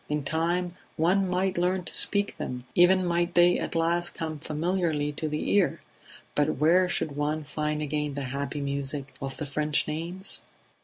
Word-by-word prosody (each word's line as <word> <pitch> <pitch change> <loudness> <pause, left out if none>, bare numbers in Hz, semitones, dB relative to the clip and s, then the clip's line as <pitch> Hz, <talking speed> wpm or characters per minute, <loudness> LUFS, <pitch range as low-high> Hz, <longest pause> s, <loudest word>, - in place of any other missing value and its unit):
In 150 -1 -1
time 170 +4 0 0.2
one 185 +4 +2
might 185 0 0
learn 180 +1 +1
to - - -4
speak 205 0 +2
them, 125 -1 -5
even 185 +1 +5
might 175 0 0
they 175 0 +5
at - - -3
last 170 +1 +1
come 155 -2 -4
familiarly 155 -1 -1
to 155 +1 -3
the 150 0 -2
ear; 200 -3 +3 0.5
but - - +1
where 175 +5 +4
should 150 -4 -1
one 150 +2 -1
find 150 +1 -2
again 150 -1 -2
the 140 - -3
happy 140 +1 -3
music 140 -1 -3
of 135 -1 -5
the 150 - -3
French 150 +1 0
names? 170 +5 -2
160 Hz, 170 wpm, -27 LUFS, 150-175 Hz, 0.5 s, even